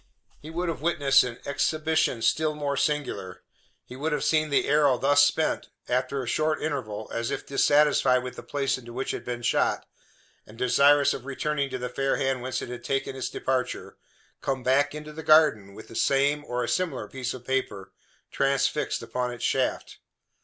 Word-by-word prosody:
He 155 - -11
would 175 +2 -3
have 160 -5 -3
witnessed 140 -5 +4
an 120 -2 -5
exhibition 150 -3 0
still 155 +6 +1
more 145 -1 -2
singular. 135 -11 -2 0.4
He 125 - -11
would 150 +4 -2
have - - -1
seen 155 -1 +2
the 140 - +2
arrow 145 -4 +4
thus 145 +2 +4
spent - - 0 0.2
after 130 +2 -1
a - - -8
short 155 +6 0
interval, 110 -9 -4
as 115 0 -2
if - - -4
dissatisfied 140 -2 +3
with 125 - -6
the - - -8
place 140 -2 -1
into 120 -1 -11
which 130 +2 -3
it - - -2
had - - -13
been 120 -1 -4
shot, - - +1 0.6
and 110 - -14
desirous 140 +3 +4
of 130 - -8
returning 140 +1 -2
to 130 - -4
the 125 0 -4
fair 135 +2 -1
hand 135 -2 -1
whence 130 +1 -3
it - - -7
had 125 0 -7
taken 135 -1 -2
its 130 - -3
departure 130 -1 -3 0.5
come 130 -2 -2
back 140 +3 +2
into 150 0 -8
the 160 - -7
garden 150 -12 +4
with 110 - -11
the 115 - -12
same, 140 +3 +2
or 125 -2 -2
a - - -3
similar 180 - -1
piece 130 0 -4
of 125 -1 -12
paper, 105 -8 -2 0.4
transfixed 135 -1 0
upon 125 -1 -3
its 120 -1 -8
shaft! 130 +1 -1
135 Hz, 190 wpm, -26 LUFS, 125-150 Hz, 0.6 s, witnessed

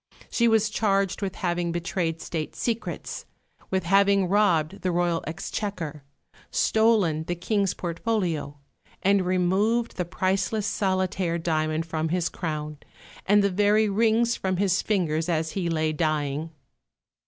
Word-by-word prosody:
She 235 - +3
was 220 -1 +3
charged 195 -3 +1
with 195 -2 -3
having 175 -2 -1
betrayed 170 -1 -2
State 155 -2 -4
secrets; 230 -1 -4 0.4
with 190 -1 0
having 195 +1 +4
robbed 190 -3 +2
the 185 - 0
Royal 175 -1 0
Exchequer; 165 -2 -4 0.5
stolen 215 -9 +2
the 175 - -2
King's 200 +2 0
portfolio; 170 -5 -2 0.5
and 195 0 +4
removed 190 +6 +1
the 180 - -1
priceless 190 +4 -1
solitaire 185 -4 0
diamond 155 -1 -1
from 160 -1 -2
his 175 0 0
crown, 150 -3 -4 0.5
and 205 +1 +5
the 200 - +2
very 205 +3 +3
rings 230 +3 +2
from 185 -1 -2
his 195 0 +2
fingers 165 -5 0
as 160 -1 0
he 180 -3 -2
lay 155 -1 0
dying. 150 -1 -1
180 Hz, 130 wpm, -26 LUFS, 165-200 Hz, 0.5 s, and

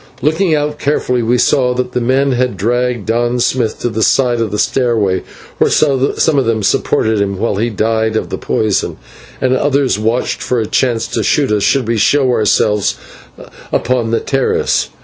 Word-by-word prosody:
Looking 160 +3 +2
out 150 0 -2
carefully 125 -4 0
we 120 +2 +1
saw 125 0 +2
that 125 0 -2
the 125 - -2
men 135 +3 +1
had 125 -4 -1
dragged 120 +2 -1
Don 120 +2 0
Smith 120 -2 0
to 120 - 0
the 110 0 -3
side 120 0 +2
of 115 - -1
the 105 - -3
stairway, 110 -7 +1 0.4
where - - +3
some 140 +1 +2
of 135 - 0
them 110 -2 0
supported 110 +2 +1
him 100 -1 -2
while 105 0 -1
he 115 +3 0
died 110 +1 -1
of - - -2
the - - -4
poison, 105 -3 -1 0.4
and 130 0 +1
others 140 -4 +1
watched 115 +3 -1
for 125 - -1
a 110 - -1
chance 120 +1 0
to - - -2
shoot 140 -6 +1
us 105 -1 +1
should 130 +2 +1
we 115 0 0
show 130 +4 +2
ourselves 105 -2 +1 0.8
upon 125 -2 0
the 115 - +1
terrace. 135 -1 0
120 Hz, 185 wpm, -14 LUFS, 110-130 Hz, 0.8 s, where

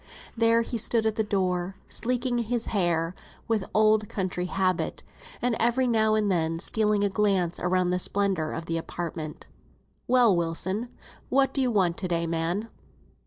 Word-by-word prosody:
There 230 0 +3
he 235 0 -3
stood 225 +1 +2
at 220 -1 +1
the 220 - +1
door, 185 -2 -1
sleeking 245 +1 -1
his 235 0 -1
hair 170 -4 +1 0.3
with 220 -4 -1
old 215 0 +3
country 185 -2 -2
habit, 185 -1 -1 0.4
and 245 -2 +2
every 240 +3 +2
now 220 -3 +2
and 210 -2 +1
then 165 -2 0
stealing 210 +3 +1
a - - +3
glance 195 -3 0
round 180 0 +1
at - - 0
the 180 - +1
splendour 190 -5 0
of 165 - -5
the 165 0 -1
apartment. 165 -2 -6 0.6
"Well, 240 -5 +5
Wilson, 170 +3 0
and - - -17 0.4
what 270 0 +2
do 275 - 0
you 255 - +2
want 185 -6 +1
to 185 - -3
day, 170 -1 0
man?" 170 +6 -2
200 Hz, 170 wpm, -26 LUFS, 175-225 Hz, 0.6 s, Well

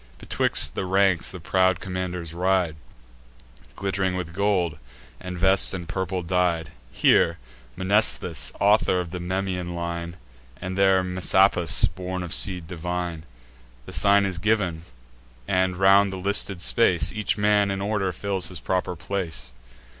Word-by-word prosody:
Betwixt - - 0
the 95 - -3
ranks 95 -2 +2
the 90 - -8
proud 95 +1 +1
commanders 90 -3 -5
ride, 90 -2 +1 1.0
Glitt'ring 95 -1 -1
with 85 -2 -5
gold, 90 -5 0 0.4
and 90 -1 -7
vests 95 +2 +3
in 90 -2 -6
purple 95 +1 -3
dyed; 85 -2 0 0.2
Here 85 +5 +3 0.4
Mnestheus, 95 -3 +1
author 100 -2 +3
of 85 -2 -5
the 90 - -5
Memmian 90 -1 -3
line, 85 0 -5 0.4
And 95 0 -5
there 95 -1 +3
Messapus, 90 -1 +3
born 90 +2 -5
of 85 - -6
seed 90 -4 0
divine. 90 -1 -4 0.6
The - - -10
sign 100 0 +4
is 95 -3 -3
giv'n; 95 -5 0 0.7
and, 95 -1 +1
round 100 +1 +5
the 95 - -5
listed 100 -1 -1
space, 90 -10 +3
Each 110 0 -1
man 105 -1 +3
in 95 0 -2
order 100 -1 -1
fills 95 0 -1
his 90 -3 -6
proper 90 -1 -2
place. 90 -7 -4
95 Hz, 140 wpm, -24 LUFS, 85-95 Hz, 1.0 s, round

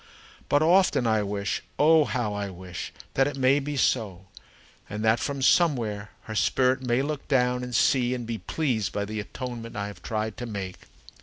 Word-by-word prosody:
But 145 +2 +4
often 175 -6 +4
I 110 -2 +3
wish 100 0 -2 0.2
oh, 155 0 +5
how 120 -7 -1
I 100 -1 -3
wish! 90 -1 -7 0.2
that 135 +1 +3
it 145 -1 -4
may 135 +2 +4
be 145 0 -4
so, 100 -9 0 0.6
and 105 +1 -3
that 110 +1 +4
from 140 +1 -3
somewhere 115 - +2
her 110 - -7
spirit 125 +5 +2
may 125 +1 +1
look 150 0 -4
down 125 -2 +2
and 125 -1 -4
see 125 -1 +3
and 120 -2 -5
be 115 -1 -4
pleased 125 - -1
by 100 0 -1
the 110 +1 -4
atonement 115 +3 -6
I 100 -1 -2
have 105 0 -9
tried 110 -1 -3
to 120 - -5
make! 95 -4 -6
120 Hz, 185 wpm, -26 LUFS, 105-135 Hz, 0.6 s, oh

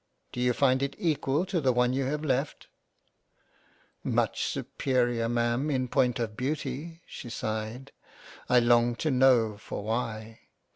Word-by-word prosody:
Do 125 - -4
you 125 0 +3
find 130 0 +3
it 140 - -2
equal 150 -1 0
to 180 -3 -1
the 135 -2 +3
one 125 0 +2
you 135 0 0
have 150 +3 -2
left? 135 +1 -1 0.5
" - - -39
" - - -36
Much - - 0
superior 120 -3 0
Ma'am 120 +4 0
in 130 -3 0
point 125 -3 +2
of 115 -3 -3
Beauty." 150 +5 -4
She 120 - -9
sighed. 110 +4 -4 0.6
I 125 -1 +5
longed 120 0 +3
to 155 - +1
know 125 -5 +4
for 105 - -6
why. 110 0 -3
125 Hz, 155 wpm, -28 LUFS, 120-135 Hz, 0.6 s, I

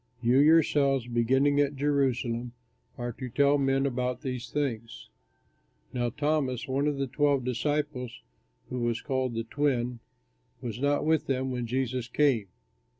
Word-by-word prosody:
You 125 +2 +3
yourselves, 145 -4 +4
beginning 130 +4 +2
at 145 0 +1
Jerusalem, 130 -4 0 0.4
are 120 0 -3
to 130 +2 -7
tell 140 +3 +3
men 135 0 +2
about 125 -2 -1
these 125 -4 -4
things." 115 - -3 0.8
Now 120 -1 0
Thomas, 145 -2 -1
one 135 +2 0
of 145 -2 0
the 135 - 0
twelve 140 0 +1
disciples, 125 -1 -2 0.5
who 125 - -3
was 120 -1 0
called 130 -4 -2
"The 115 - -1
Twin," 125 -2 -1 0.6
was 120 -3 -5
not 145 +1 +1
with 160 -1 +2
them 130 -1 -1
when 125 -2 -3
Jesus 125 0 -2
came. 125 -5 +2
130 Hz, 145 wpm, -28 LUFS, 120-145 Hz, 0.8 s, yourselves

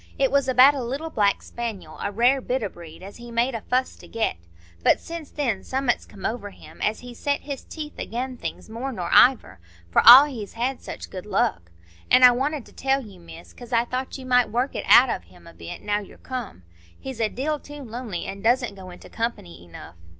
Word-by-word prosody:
It 270 -1 +2
was 280 -1 +2
about 260 +2 +7
a 275 - -4
little 280 +7 -4
black 205 -5 +1
spaniel—a 205 -6 -6
rare 245 +6 +3
bit 255 -1 -2
o' 205 - -2
breed—as 175 +3 -12
he 240 0 -11
made 235 +3 0
a 225 - -4
fuss 255 +3 -1
to - - -14
get. 225 - -1 0.5
But - - +4
since 330 -3 -8
then 235 -10 -2
summat's 260 -2 -1
come 195 - -10
over 220 -3 -3
him, - - -15
as 215 - -1
he's 245 -1 -11
set 285 0 -1
his 280 -2 -6
teeth 305 -2 -8
again' 255 +2 -4
things - - -6
more 235 +5 -5
nor 180 -8 -5
iver, 240 - +5 0.3
for - - +4
all 250 +5 +11
he's 235 -8 -7
had 245 +3 -2
such - - -8
good 185 +2 -8
luck. 85 - 0 0.4
An' 255 - +6
I 250 - +10
wanted 275 +2 -2
to - - -18
tell 270 0 0
you, 195 -4 -14
Miss, 170 0 -13
'cause 245 0 -13
I 235 0 +2
thought 255 +3 -4
you 260 - -10
might 250 -2 +3
work 245 +5 -1
it - - -4
out 245 0 +7
of - - -4
him 85 0 -19
a 85 - -13
bit, 85 0 -9
now 205 0 0
you're 205 - -12
come. 245 - -7 0.4
He's 265 -3 -7
a 220 - +2
deal 295 +6 -2
too 290 0 -10
lonely, 230 -6 -6
and 195 0 -7
doesn't 245 0 +2
go 190 -2 -11
into 180 - -12
company 90 - -5
enough." 85 0 -12
240 Hz, 220 wpm, -24 LUFS, 200-265 Hz, 0.5 s, all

